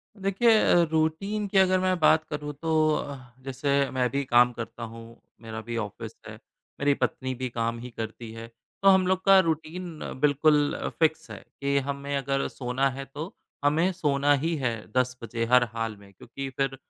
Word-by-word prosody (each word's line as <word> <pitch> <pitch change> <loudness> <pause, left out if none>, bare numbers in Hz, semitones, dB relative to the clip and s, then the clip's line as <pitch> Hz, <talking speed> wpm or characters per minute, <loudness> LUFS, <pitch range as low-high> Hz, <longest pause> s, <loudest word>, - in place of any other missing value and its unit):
देखिए 195 +3 +2
अ, 175 - +5
रूटीन 180 +7 0
की 195 0 0
अगर 185 -1 +5
मैं 185 -1 +1
बात 155 0 +5
करूँ 150 -1 -4
तो 165 -1 -1 0.2
अ, 140 -1 -4 0.3
जैसे 140 +1 0
मैं 125 -1 +1
भी 140 0 -1
काम 120 0 +5
करता 115 0 -7
हूँ, 115 +1 -10 0.2
मेरा 110 -1 -6
भी 115 +1 -5
ऑफ़िस 105 -3 -5
है, - - -8 0.5
मेरी 145 0 +3
पत्नी 130 -1 -1
भी 130 +1 -4
काम 115 0 -2
ही 125 +1 -8
करती 110 +1 -6
है। 115 0 -8 0.4
तो - - +5
हम 190 -1 +5
लोग 185 0 +1
का 195 -1 +8
रूटीन 165 0 -2 0.2
बिल्कुल 150 0 +3 0.2
फिक्स 160 -1 +1
है - - -7 0.2
कि 140 0 +1
हमें 140 0 -3
अगर 135 0 -1
सोना 130 +2 -1
है 135 +1 -6
तो 150 +8 -7 0.3
हमें 160 +6 +3
सोना 145 -5 +2
ही 160 +4 0
है 130 -6 -1 0.2
10 125 0 +1
बजे 115 0 -2
हर 125 0 +7
हाल 115 -1 -3
में 100 -1 -17
क्योंकि 135 +7 -7
फिर 135 -1 0
140 Hz, 185 wpm, -26 LUFS, 120-160 Hz, 0.5 s, का